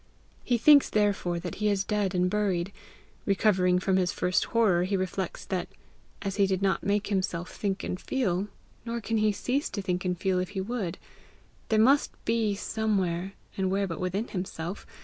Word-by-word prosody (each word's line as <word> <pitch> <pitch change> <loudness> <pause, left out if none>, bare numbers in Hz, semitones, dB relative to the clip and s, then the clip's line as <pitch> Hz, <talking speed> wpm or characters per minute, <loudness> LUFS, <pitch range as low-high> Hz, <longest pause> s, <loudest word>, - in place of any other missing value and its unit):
He 245 - +2
thinks 285 +4 +6
therefore 205 -4 +1
that 175 -2 -5
he 210 - +3
is 200 -1 +1
dead 205 -2 -1
and 180 0 +3
buried. 190 -2 0 0.6
Recovering 190 -3 +3
from 190 +1 +1
his 180 -1 +2
first 180 0 +1
horror, 200 -7 +3
he 195 +2 0
reflects 185 -1 -3
that, 185 -2 -2 0.6
as 195 0 -3
he 200 -1 +4
did 190 -1 0
not 195 - +2
make 200 +1 +1
himself 185 -2 -1
think 195 -2 -2
and 180 - -3
feel, 200 -7 0 0.4
nor 235 0 -3
can 225 0 -1
cease 255 +7 -1
to - - -4
think 180 -2 -1
and 180 -2 -1
feel 185 -1 +1
if 180 - -2
he - - +1
would, 200 -4 -3 0.7
there 220 - +3
must 265 +6 +4
be 225 -3 +1
somewhere 195 -4 -1 0.2
and 190 -1 0
where 195 +1 +1
but 165 -4 -5
within 190 +5 -2
himself? 180 -1 -5
195 Hz, 180 wpm, -28 LUFS, 180-210 Hz, 0.7 s, thinks